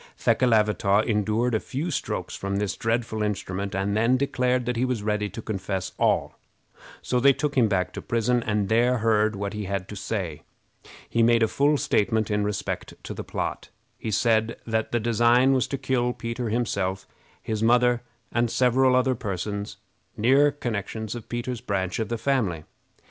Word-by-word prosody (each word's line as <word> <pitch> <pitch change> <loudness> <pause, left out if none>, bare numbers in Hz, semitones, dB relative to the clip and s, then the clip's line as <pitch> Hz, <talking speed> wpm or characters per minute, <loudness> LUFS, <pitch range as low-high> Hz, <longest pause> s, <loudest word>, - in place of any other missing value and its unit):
Thekelavitaw 105 -4 +3
endured 110 +2 +1
a 110 - +2
few 150 +10 -4
strokes 140 - -3
from 100 0 -3
this 100 -2 -1
dreadful 115 -1 -1
instrument, 100 -1 -3
and 100 +1 0
then 115 +4 +3
declared 125 -2 0
that 125 0 -1
he 120 - 0
was 125 -5 -1
ready 105 -1 0
to 110 +4 -8
confess 95 -2 -3
all; - - +1 0.6
so 125 - +1
they 140 +2 +6
took 145 +1 -2
him 120 -4 +4
back 90 -3 0
to - - -6
prison 120 +1 +1
and 105 -3 0
there 120 +3 +3
heard 110 -1 +2
what 100 +1 -4
he 105 -1 -4
had 100 -1 -3
to 105 - -7
say. 95 -6 -4 0.7
He 115 - +1
made 115 0 +4
a - - +4
full 145 +5 +2
statement 110 -6 +1
in 105 0 +1
respect 105 -1 -3
to - - -6
the - - -6
plot. - - -4 0.3
He - - -4
said 110 +1 +1
that 110 -1 -1
the 120 - +1
design 120 +3 +4
was 130 -2 +1
to 140 - -3
kill 125 -2 0
Peter 115 0 -4
himself, 100 -5 -1 0.3
his 110 -1 -3
mother, 120 +1 +4 0.3
and 120 0 +1
several 130 +2 +3
other 130 +1 +3
persons, 100 -1 -4 0.4
near 135 +6 +5
connections 110 -4 -4
of 120 -3 -8
Peter's 120 0 -3
branch 95 +1 -2
of 110 - -2
the 120 - -1
family. 110 - 0
115 Hz, 175 wpm, -25 LUFS, 105-125 Hz, 0.7 s, they